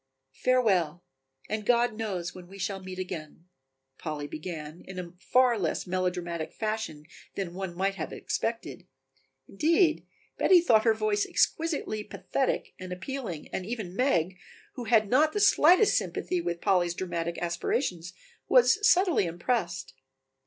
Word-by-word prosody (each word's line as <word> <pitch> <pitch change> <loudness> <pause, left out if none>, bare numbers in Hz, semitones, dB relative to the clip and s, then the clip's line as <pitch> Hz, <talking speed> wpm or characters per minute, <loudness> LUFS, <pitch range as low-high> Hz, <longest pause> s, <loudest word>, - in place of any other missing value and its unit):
"Farewell, 190 -10 +2 0.4
and 215 0 -3
God 240 +1 +3
knows 195 -6 -3
when 180 -1 -11
we 195 +2 -12
shall 195 0 -3
meet 185 0 -8
again," 170 -3 -6 0.5
Polly 150 -3 -4
began 155 +1 -7
in 190 - -8
a 175 -2 -6
far 250 +1 +3
less 165 -5 -1
melodramatic 175 -3 -2
fashion 215 -9 -3 0.3
than 185 -3 -3
one 190 -2 -5
might 195 +2 0
have - - -4
expected; 225 -5 -4 0.6
indeed, 320 - +2 0.3
Betty 370 -2 +6
thought 235 -10 +4
her 225 -1 +4
voice 215 -1 +1
exquisitely 295 -10 0
pathetic 265 +5 -2
and 185 0 -7
appealing 190 - -5
and 190 - -2
even 205 -3 -5
Meg, 185 - +1 0.3
who 245 -4 -6
had 220 -2 +4
not 300 +8 +3
the 415 - 0
slightest 370 0 +5
sympathy 360 -1 -1
with 170 - -3
Polly's 175 -3 +2
dramatic 170 -2 -3
aspirations, 175 - -2 0.4
was - - +5
subtly 360 - +4
impressed. 175 - -2
190 Hz, 140 wpm, -28 LUFS, 175-240 Hz, 0.6 s, Betty